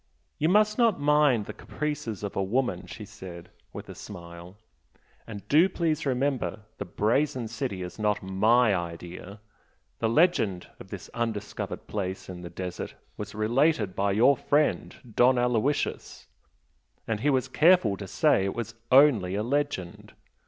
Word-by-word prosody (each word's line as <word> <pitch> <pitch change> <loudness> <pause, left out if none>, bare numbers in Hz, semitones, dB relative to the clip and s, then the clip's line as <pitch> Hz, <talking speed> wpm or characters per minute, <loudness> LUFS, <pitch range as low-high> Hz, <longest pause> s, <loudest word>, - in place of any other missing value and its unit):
"You 155 - +2
must 215 +3 +3
not 230 -7 +3
mind 145 -6 +3
the - - -7
caprices 140 -9 -5
of 100 - -4
a - - 0
woman!" 100 -3 -1
she 90 +5 -8
said, 95 -5 -11 0.2
with - - -9
a - - -8
smile 85 -1 -11 0.7
"And 105 -3 -9
do 165 +6 +5
please 160 -4 -1
remember 130 -4 -1 0.2
the 100 - -3
'Brazen 120 +6 0
City' 110 -5 -4
is 90 +4 -8
not 105 -1 0
MY 110 +4 +3
idea! 90 +3 -6 0.6
The 110 - +1
legend 115 - +2
of - - -12
this - - -8
undiscovered 110 -3 -4
place 95 -3 -4
in 90 -1 -7
the 85 - -7
desert 90 +1 -6 0.2
was 105 -1 -7
related 110 - +1
by 100 0 +1
your 120 +7 +5
friend 145 +3 0 0.2
Don 125 +1 +5
Aloysius 125 +3 -1 0.8
and 110 -2 -1
he 145 - +1
was 130 -3 +1
careful 155 - +4
to - - -7
say 95 - +2
it 100 - -3
was 115 -1 -4 0.2
'only' 125 -9 +5
a 105 - -1
legend. 130 -9 -3
110 Hz, 150 wpm, -27 LUFS, 95-140 Hz, 0.8 s, do